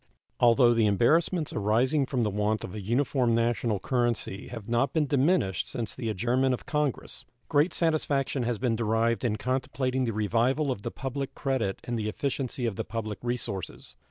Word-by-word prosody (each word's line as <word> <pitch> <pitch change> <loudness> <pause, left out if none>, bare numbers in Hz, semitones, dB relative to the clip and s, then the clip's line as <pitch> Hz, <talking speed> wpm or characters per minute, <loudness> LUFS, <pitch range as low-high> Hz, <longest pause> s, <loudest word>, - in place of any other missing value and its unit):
Although 120 0 +5
the 115 -2 +3
embarrassments 155 - +2
arising 125 +7 +2
from 125 -4 0
the 105 - 0
want 105 +1 0
of 90 - -6
an 105 - -6
uniform 120 +1 +1
national 115 -2 +1
currency 120 -4 -1
have 115 -4 -8
not 120 +3 +1
been 155 -2 +2
diminished 140 - +1
since 115 -3 -4
the 115 - -4
adjournment 125 +5 +1
of - - -14
Congress, 150 -4 -2 0.3
great 150 +5 +3
satisfaction 145 -5 0
has 120 -1 -1
been 120 0 0
derived 115 +1 +1
in 115 -4 +1
contemplating 130 +2 -1
the 115 - -2
revival 120 +7 +1
of 105 - -4
the - - -3
public 135 +1 -5
credit 130 -9 -1
and 120 -1 -3
the 110 0 -1
efficiency 130 +1 -2
of 110 -4 -2
the - - -1
public 110 -1 -5
resources. 110 - -4
120 Hz, 175 wpm, -28 LUFS, 110-135 Hz, 0.3 s, Although